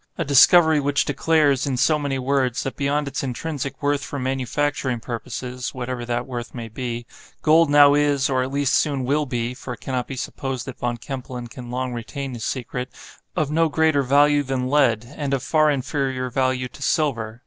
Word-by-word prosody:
a 165 Hz, -, -1 dB
discovery 160 Hz, +3 st, +6 dB
which 145 Hz, 0 st, +1 dB
declares, 150 Hz, -5 st, +2 dB
in 130 Hz, -2 st, -1 dB
so 155 Hz, +4 st, +3 dB
many 140 Hz, -2 st, -2 dB
words, 130 Hz, -1 st, 0 dB
that 135 Hz, -, -4 dB
beyond 145 Hz, +1 st, 0 dB
its 140 Hz, -, -3 dB
intrinsic 135 Hz, +1 st, -4 dB
worth 145 Hz, 0 st, +1 dB
for 145 Hz, -, -5 dB
manufacturing 130 Hz, 0 st, -1 dB
purposes 125 Hz, +2 st, -5 dB
(whatever 125 Hz, -1 st, -4 dB
that 120 Hz, 0 st, -2 dB
worth 120 Hz, -2 st, -6 dB
may 115 Hz, -2 st, -5 dB
be), 120 Hz, +1 st, -5 dB, 0.4 s
gold 160 Hz, 0 st, +5 dB
now 145 Hz, -1 st, +7 dB
is, 145 Hz, -2 st, +2 dB
or 130 Hz, -2 st, +1 dB
at 130 Hz, +1 st, -3 dB
least 140 Hz, -1 st, +1 dB
soon 140 Hz, -3 st, +1 dB
will 145 Hz, +3 st, +1 dB
be 120 Hz, -1 st, -2 dB
(for 125 Hz, 0 st, -7 dB
it -, -, -26 dB
cannot 130 Hz, -2 st, -3 dB
be 135 Hz, -, -6 dB
supposed 130 Hz, 0 st, -4 dB
that 130 Hz, -, -8 dB
Von 120 Hz, -1 st, -2 dB
Kempelen 125 Hz, 0 st, -6 dB
can 120 Hz, +1 st, -10 dB
long 125 Hz, 0 st, -3 dB
retain 135 Hz, +3 st, -5 dB
his 115 Hz, -2 st, -5 dB
secret), 125 Hz, 0 st, -4 dB, 0.5 s
of 150 Hz, -2 st, 0 dB
no 165 Hz, +1 st, +2 dB
greater 155 Hz, -1 st, +2 dB
value 145 Hz, +2 st, +4 dB
than 130 Hz, -2 st, -2 dB
lead, 125 Hz, -6 st, +3 dB
and 140 Hz, -2 st, -1 dB
of 135 Hz, -, -4 dB
far 155 Hz, +1 st, +3 dB
inferior 135 Hz, -2 st, -1 dB
value 130 Hz, 0 st, 0 dB
to -, -, -15 dB
silver. 115 Hz, -8 st, 0 dB
135 Hz, 190 wpm, -22 LUFS, 125-145 Hz, 0.5 s, now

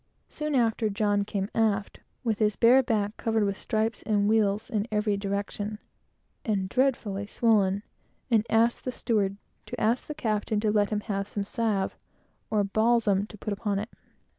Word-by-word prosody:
Soon 300 Hz, -1 st, -3 dB
after, 225 Hz, -2 st, +2 dB
John 205 Hz, -1 st, +1 dB
came 200 Hz, -1 st, -2 dB
aft, 215 Hz, -2 st, 0 dB, 0.2 s
with 225 Hz, -3 st, 0 dB
his 210 Hz, -2 st, +2 dB
bare 245 Hz, +5 st, +6 dB
back 215 Hz, -4 st, -1 dB
covered 225 Hz, -1 st, +1 dB
with 200 Hz, -1 st, 0 dB
stripes 220 Hz, +1 st, -1 dB
and 205 Hz, -2 st, +1 dB
wales 215 Hz, -1 st, +2 dB
in 215 Hz, -3 st, -1 dB
every 210 Hz, -1 st, +1 dB
direction, 200 Hz, +1 st, -3 dB, 0.7 s
and 200 Hz, -4 st, 0 dB
dreadfully 210 Hz, -4 st, 0 dB
swollen, 205 Hz, -3 st, +2 dB, 0.5 s
and 220 Hz, -2 st, +4 dB
asked 230 Hz, +2 st, +2 dB
the 255 Hz, -, -2 dB
steward 200 Hz, -5 st, 0 dB, 0.3 s
to -, -, -6 dB
ask 230 Hz, +3 st, +1 dB
the 300 Hz, -, -5 dB
captain 215 Hz, -2 st, -1 dB
to 215 Hz, -1 st, +2 dB
let 205 Hz, -1 st, +2 dB
him 210 Hz, -1 st, -1 dB
have 200 Hz, -2 st, -3 dB
some 205 Hz, -1 st, -3 dB
salve, 205 Hz, -2 st, -1 dB, 0.5 s
or 215 Hz, -2 st, +2 dB
balsam, 215 Hz, -1 st, +2 dB
to 215 Hz, -, -12 dB
put 210 Hz, +1 st, -3 dB
upon 200 Hz, 0 st, -2 dB
it. 210 Hz, +3 st, -3 dB
210 Hz, 165 wpm, -27 LUFS, 200-225 Hz, 0.7 s, bare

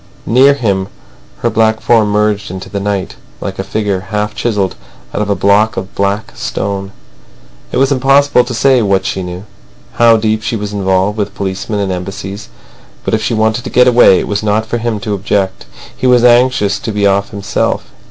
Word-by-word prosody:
Near 135 Hz, +4 st, +5 dB
him, 100 Hz, -7 st, -1 dB, 0.5 s
her -, -, +1 dB
black 110 Hz, 0 st, +2 dB
form 110 Hz, -3 st, +3 dB
merged 105 Hz, 0 st, 0 dB
in 95 Hz, -, -5 dB
the 95 Hz, +2 st, -6 dB
night, 100 Hz, -1 st, -3 dB, 0.2 s
like 95 Hz, -1 st, -6 dB
a -, -, -1 dB
figure 100 Hz, 0 st, -2 dB
half 105 Hz, 0 st, -2 dB
chiselled 105 Hz, -5 st, -1 dB, 0.4 s
out -, -, -1 dB
of 105 Hz, -, -2 dB
a 100 Hz, -, +2 dB
block 105 Hz, +3 st, +2 dB
of 95 Hz, +1 st, -5 dB
black 100 Hz, +2 st, -2 dB
stone. 100 Hz, 0 st, -4 dB, 0.8 s
It -, -, -1 dB
was 135 Hz, +1 st, +2 dB
impossible 135 Hz, 0 st, +3 dB
to 125 Hz, -, -5 dB
say 130 Hz, +2 st, +3 dB
what 100 Hz, -2 st, +1 dB
she 95 Hz, -, -2 dB
knew, 90 Hz, +1 st, -6 dB, 0.5 s
how 115 Hz, -1 st, +5 dB
deep 110 Hz, 0 st, 0 dB
she 115 Hz, -, -2 dB
was 105 Hz, -1 st, -4 dB
involved 95 Hz, +1 st, 0 dB
with 100 Hz, -1 st, -3 dB
policemen 100 Hz, +2 st, -3 dB
and 100 Hz, -2 st, -1 dB
Embassies. 95 Hz, +2 st, -6 dB, 0.6 s
But -, -, -2 dB
if 110 Hz, -, +1 dB
she 115 Hz, -, -1 dB
wanted 110 Hz, +2 st, +1 dB
to -, -, -5 dB
get 125 Hz, 0 st, +4 dB
away, 120 Hz, -6 st, +6 dB
it -, -, -2 dB
was 105 Hz, -1 st, -1 dB
not 110 Hz, +1 st, 0 dB
for 120 Hz, +1 st, -3 dB
him 115 Hz, -2 st, -2 dB
to 105 Hz, -1 st, -3 dB
object. 100 Hz, -1 st, -2 dB, 0.3 s
He 130 Hz, -, -1 dB
was 125 Hz, -1 st, +4 dB
anxious 120 Hz, -5 st, +3 dB
to 110 Hz, -, -4 dB
be 105 Hz, -1 st, 0 dB
off 100 Hz, 0 st, +2 dB
himself. 100 Hz, -2 st, -2 dB
105 Hz, 195 wpm, -13 LUFS, 100-115 Hz, 0.8 s, away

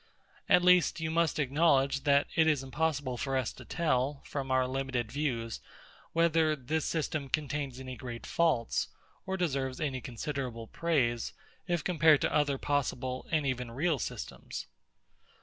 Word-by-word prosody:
At 180 Hz, -1 st, +6 dB
least, 180 Hz, -2 st, +5 dB
you 160 Hz, 0 st, -2 dB
must 165 Hz, -1 st, +2 dB
acknowledge, 140 Hz, -1 st, +2 dB
that 140 Hz, 0 st, +5 dB
it 160 Hz, -1 st, +4 dB
is 150 Hz, -4 st, +2 dB
impossible 140 Hz, -2 st, -1 dB
for 135 Hz, +2 st, -1 dB
us 130 Hz, -2 st, -1 dB
to -, -, -12 dB
tell, 140 Hz, -4 st, 0 dB
from 135 Hz, -2 st, -4 dB
our 130 Hz, -1 st, +3 dB
limited 130 Hz, -3 st, -2 dB
views, 125 Hz, -6 st, -2 dB, 0.5 s
whether 165 Hz, -2 st, +3 dB
this 150 Hz, +3 st, -2 dB
system 155 Hz, -3 st, -2 dB
contains 145 Hz, -3 st, -2 dB
any 130 Hz, -1 st, -6 dB
great 120 Hz, 0 st, -7 dB
faults, 155 Hz, -9 st, +1 dB, 0.4 s
or 190 Hz, 0 st, -1 dB
deserves 135 Hz, -7 st, -1 dB
any 135 Hz, -4 st, -2 dB
considerable 125 Hz, -2 st, -4 dB
praise, 120 Hz, -5 st, 0 dB, 0.3 s
if 175 Hz, -4 st, 0 dB
compared 160 Hz, -4 st, +5 dB
to -, -, 0 dB
other 145 Hz, -2 st, +2 dB
possible, 130 Hz, -3 st, -1 dB
and 155 Hz, -3 st, +1 dB
even 125 Hz, -2 st, -1 dB
real 145 Hz, +5 st, 0 dB
systems. -, -, -5 dB
140 Hz, 150 wpm, -31 LUFS, 130-160 Hz, 0.5 s, At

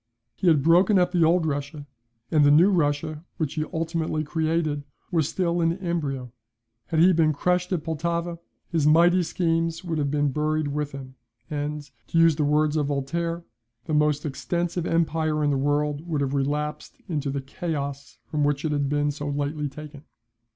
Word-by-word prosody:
He 190 Hz, -, -2 dB
had 155 Hz, -5 st, +4 dB
broken 180 Hz, +6 st, +5 dB
up 180 Hz, -1 st, +3 dB
the 175 Hz, -2 st, +3 dB
old 165 Hz, +1 st, +3 dB
Russia; 145 Hz, 0 st, -3 dB, 0.5 s
and 155 Hz, -2 st, +4 dB
the 145 Hz, -, +6 dB
New 165 Hz, +7 st, +6 dB
Russia, 150 Hz, -2 st, 0 dB
which 155 Hz, -4 st, -2 dB
he 155 Hz, -1 st, -2 dB
ultimately 165 Hz, -2 st, -1 dB
created, 155 Hz, -1 st, -1 dB, 0.3 s
was 160 Hz, -4 st, +1 dB
still 175 Hz, -2 st, 0 dB
in 165 Hz, +1 st, +1 dB
embryo. 145 Hz, -9 st, -3 dB, 0.6 s
Had 160 Hz, -2 st, 0 dB
he 180 Hz, +3 st, +6 dB
been 160 Hz, -2 st, +3 dB
crushed 180 Hz, +4 st, 0 dB
at 175 Hz, -5 st, -1 dB
Pultowa, 170 Hz, +1 st, -2 dB, 0.3 s
his 160 Hz, -4 st, +1 dB
mighty 170 Hz, +4 st, +5 dB
schemes 165 Hz, -1 st, -1 dB
would 165 Hz, -3 st, -2 dB
have 140 Hz, -1 st, 0 dB
been 145 Hz, -1 st, +1 dB
buried 155 Hz, +1 st, 0 dB
with 145 Hz, 0 st, -2 dB
him; 130 Hz, -1 st, -9 dB, 0.3 s
and 150 Hz, 0 st, -3 dB, 0.2 s
(to -, -, -2 dB
use 165 Hz, -1 st, +5 dB
the 150 Hz, -, 0 dB
words 150 Hz, +1 st, +2 dB
of 145 Hz, -2 st, +1 dB
Voltaire) 165 Hz, +5 st, -2 dB, 0.4 s
"the 155 Hz, -, -3 dB
most 150 Hz, 0 st, +2 dB
extensive 170 Hz, +4 st, -2 dB
empire 160 Hz, -2 st, +1 dB
in 145 Hz, -, +2 dB
the -, -, +1 dB
world 145 Hz, +3 st, 0 dB
would 155 Hz, -4 st, -1 dB
have 140 Hz, 0 st, -1 dB
relapsed 150 Hz, +2 st, -2 dB
into 150 Hz, -4 st, -2 dB
the 140 Hz, +1 st, -2 dB
chaos 140 Hz, 0 st, -5 dB
from 150 Hz, -1 st, -1 dB
which 145 Hz, +1 st, 0 dB
it 155 Hz, -, 0 dB
had 145 Hz, -2 st, 0 dB
been 145 Hz, 0 st, +1 dB
so 145 Hz, 0 st, -5 dB
lately 145 Hz, +1 st, -2 dB
taken." 150 Hz, 0 st, -10 dB
155 Hz, 180 wpm, -25 LUFS, 145-165 Hz, 0.6 s, the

